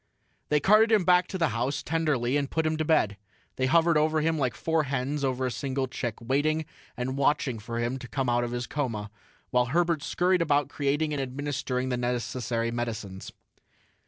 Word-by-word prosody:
They 150 - +3
carted 215 +6 +5
him 210 -5 +4
back 180 0 +4
to 190 - -4
the 165 -3 +2
house, 125 +5 -2
tenderly, 145 -6 0
and 140 -1 0
put 160 0 0
him 155 0 +1
to 155 - 0
bed. 110 -10 +2 0.4
They 130 0 +1
hovered 165 +2 +4
over 155 +1 +2
him 160 0 +1
like 130 -3 0
four 160 -2 0
hens 140 +2 -2
over 130 -1 0
a 130 - -1
single 135 +1 -2
chick, 120 -3 -4
waiting 145 +6 0 0.3
and 130 +2 -3
watching 135 -4 +1
for 115 +2 -5
him 120 +3 -1
to 125 - -8
come 130 +4 -2
out 120 0 +2
of 120 - -2
his 120 0 -3
coma, 115 -8 -3 0.4
while 125 0 +3
Herbert 170 +2 +1
scurried 180 +3 +1
about 145 -3 +2
creating 145 +2 0
and 140 - -1
administering 130 -1 -2
the 125 - 0
necessary 120 -1 -2
medicines. 110 -5 -5
135 Hz, 190 wpm, -27 LUFS, 125-155 Hz, 0.4 s, carted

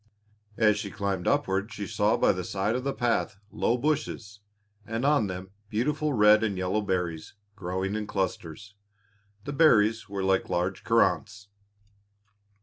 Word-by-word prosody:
As 105 -2 +3
she 105 -2 -4
climbed 100 -3 -3
upward 95 +3 0
she 105 - -5
saw 105 +3 +1
by - - +4
the 90 -1 -3
side 100 +5 -1
of 125 - -2
the 140 - -1
path 120 -6 -1
low 120 - 0
bushes, 125 -7 -2 0.4
and 115 +3 -3
on 145 -7 +3
them 95 0 -7 0.2
beautiful 150 +7 0
red 105 -1 +5
and 100 -4 -1
yellow 95 +3 0
berries, 90 -5 -3 0.2
growing 95 0 -3
in 105 -1 -3
clusters. 100 0 -4 0.7
The 145 - -5
berries 115 -9 +3
were 100 -1 -3
like 95 0 +1
large 90 +2 -1
currants. 105 -1 +1
105 Hz, 145 wpm, -27 LUFS, 95-115 Hz, 0.7 s, red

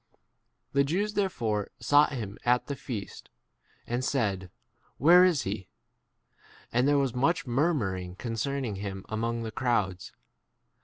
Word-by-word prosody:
The 140 0 +4
Jews 195 +9 -1
there 205 -2 +1
fore 105 - -2
sought 145 +1 +4
him 105 -6 -5
at 125 0 +2
the 140 - -4
feast, 110 -7 -7 0.6
and 120 +1 -2
2 130 - -1
said, 100 -9 -1 0.5
Where 175 +6 +7
is 175 -7 +3
he?" 95 -1 -4 1.1
And 125 +3 +3
there 145 0 +4
was 135 -4 +1
much 145 +8 +1
murmuring 115 - 0
concerning 115 +1 -3
him 95 -1 -5
among 115 +1 -2
the 110 - -4
crowds. 105 -8 -1
120 Hz, 140 wpm, -28 LUFS, 105-140 Hz, 1.1 s, Where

